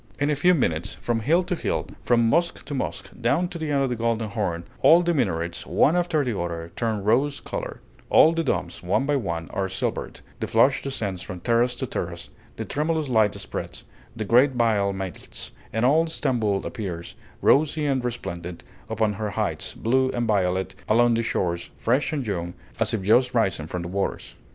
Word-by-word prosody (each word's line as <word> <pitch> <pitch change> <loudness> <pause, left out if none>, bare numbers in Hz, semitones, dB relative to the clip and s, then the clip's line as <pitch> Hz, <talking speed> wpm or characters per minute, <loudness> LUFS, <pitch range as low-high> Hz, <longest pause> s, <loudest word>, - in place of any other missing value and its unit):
In 145 +1 +1
a - - +2
few 180 +6 +4
minutes, 85 - -1
from 120 -1 -1
hill 165 +11 +3
to 180 +1 -2
hill, 175 - -1 0.2
from 115 -1 +3
mosque 170 +8 +1
to 145 - -6
mosque, 130 - -4
down 140 +10 +2
to 170 - -7
the 160 -1 -3
end 140 -1 +2
of 135 - 0
the - - 0
Golden 115 -1 -1
Horn, 95 -6 -2 0.2
all 170 +2 +7
the 175 0 +1
minarets, 85 - -1
one 155 - +3
after 175 -4 +1
the 120 -4 -1
other, 85 -1 -4
turn 110 -4 -1
rose 130 +7 +2
color; - - -6 0.3
all 160 - +7
the 165 0 0
domes, 135 - -2
one 95 +10 +1
by 145 0 +1
one, 85 -10 -2
are 95 -1 -1
silvered, 95 - -3 0.2
the - - -2
flush - - +4
descends 105 -9 -3
from 90 0 -7
terrace 120 +5 +2
to - - -3
terrace, - - -5 0.2
the - - -5
tremulous 155 0 -1
light 110 -4 +3
spreads, - - -6 0.3
the 110 -2 -3
great 125 +6 +5
veil 110 -5 +2
melts, 95 -3 -6 0.2
and 110 +2 +1
all 160 +5 +4
Stamboul 120 -11 0
appears, 90 -6 -5 0.3
rosy 150 +1 +3
and 135 -3 +1
resplendent 90 -8 -5 0.3
upon 110 -1 +1
her 105 +1 -3
heights, 100 - -2
blue 130 +3 +2
and 120 -1 0
violet 95 -3 +1 0.2
along 120 +2 +5
the 115 - +1
shores, 85 -6 -1
fresh 130 +6 +1
and 145 -5 -2
young, 90 -4 -3 0.2
as - - +2
if 105 -4 -2
just 125 +5 +3
risen 95 -9 +1
from 90 +1 -4
the - - -5
waters. 95 +2 -3
115 Hz, 195 wpm, -25 LUFS, 95-140 Hz, 0.3 s, all